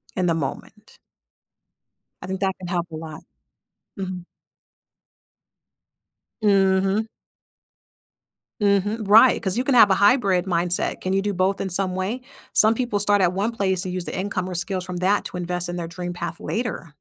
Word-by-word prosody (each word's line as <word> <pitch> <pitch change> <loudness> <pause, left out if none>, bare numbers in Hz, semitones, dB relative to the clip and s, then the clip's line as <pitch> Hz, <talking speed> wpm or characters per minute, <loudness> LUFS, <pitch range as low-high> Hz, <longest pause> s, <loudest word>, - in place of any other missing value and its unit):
In 185 - 0
the 170 - +2
moment. 150 -5 -6 1.3
I - - -6
think 190 0 -4
that 190 -1 0
can 180 - -8
help 175 -1 -2
a 160 - -7
lot, 155 -1 -8 0.8
mhm. 185 -2 -5 2.2
Mhm. 195 +1 +2 1.6
Mhm, 205 +2 +1
right 225 +5 +6
'cause 190 +2 -1
you 250 - 0
can 275 -2 +1
have 215 -4 +7
a - - +5
hybrid 200 -4 +3
mindset, 175 -1 -1
can 185 - -2
you 195 - +2
do 205 0 -2
both 190 +2 0
in 195 - -2
some 185 0 +1
way? 195 +7 -3 0.3
Some 220 +1 +6
people 235 -4 -1
start 205 0 +2
at 180 -1 +3
one 205 +4 -1
place 190 -4 0
and 180 - -4
use 180 -1 -3
the - - -5
income 185 -1 -3
or 180 - -5
skills 185 +1 -1
from 180 -1 -6
that 195 +3 +1
to - - -7
invest 175 0 -3
in 175 - -4
their 170 -1 -4
dream 175 +1 -6
path 170 -1 -6
later. 215 -9 -4
190 Hz, 175 wpm, -23 LUFS, 180-205 Hz, 2.2 s, have